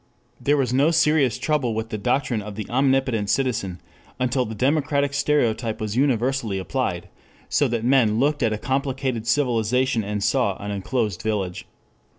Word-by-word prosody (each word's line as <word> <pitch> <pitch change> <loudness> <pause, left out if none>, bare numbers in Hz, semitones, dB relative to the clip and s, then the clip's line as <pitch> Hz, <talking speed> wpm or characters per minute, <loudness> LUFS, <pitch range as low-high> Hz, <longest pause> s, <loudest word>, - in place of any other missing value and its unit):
There 145 +1 +2
was 130 -3 0
no 140 +4 +4
serious 150 -6 +3
trouble 130 -4 0
with 110 0 -3
the 110 - -3
doctrine 125 -1 0
of 105 0 -8
the 105 -1 -5
omnicompetent 130 -4 +1
citizen 115 -10 -1 0.4
until 125 0 +1
the 110 0 -6
democratic 140 +3 +1
stereotype 120 -6 0
was 110 -1 -3
universally 125 -4 +1
applied, 95 - -2 0.4
so 145 - +2
that 115 -2 -2
men 120 -4 +3
looked 145 +3 +1
at 115 -3 +2
a 110 - -1
complicated 130 -2 -2
civilization 120 -1 +1
and 105 0 -3
saw 120 -8 +1
an 100 0 -5
enclosed 105 0 -2
village. 95 -4 -3
125 Hz, 160 wpm, -23 LUFS, 110-135 Hz, 0.4 s, no